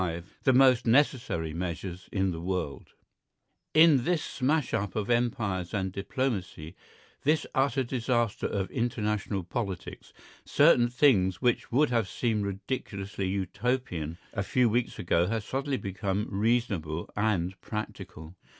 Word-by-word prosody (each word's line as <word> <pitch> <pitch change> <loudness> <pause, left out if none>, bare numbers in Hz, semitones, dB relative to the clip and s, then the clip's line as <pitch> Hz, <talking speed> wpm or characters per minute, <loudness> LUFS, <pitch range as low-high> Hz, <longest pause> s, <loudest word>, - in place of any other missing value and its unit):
V 85 -2 -2 0.2
THE 130 - +5
MOST 125 -2 +5
NECESSARY 115 - +2
MEASURES 90 +2 -5
IN 95 -1 +1
THE 80 -1 -5
WORLD 90 -5 -4 0.8
In 155 -5 +7
this 175 +1 +1
smash 140 +2 0
up 100 -4 -1
of 110 +1 -1
empires 110 -6 0
and 95 -2 -1
diplomacy, 100 - -3 0.5
this 155 +1 +2
utter 135 0 +2
disaster 120 -3 0
of 95 -2 -3
international 105 -5 -1
politics, 95 0 -5 0.3
certain 140 -6 +4
things 105 - +3
which 125 -2 0
would 145 +3 +3
have 115 -5 +1
seemed 110 -4 0
ridiculously 100 -1 -4
Utopian 95 -4 -2 0.2
a 100 - -1
few 120 +4 +2
weeks 120 +2 0
ago 85 0 +1
have 110 +1 -1
suddenly 135 +3 -2
become 100 0 -2
reasonable 100 -7 0
and 95 -4 0
practicable. 95 -7 -7
105 Hz, 130 wpm, -28 LUFS, 95-125 Hz, 0.8 s, In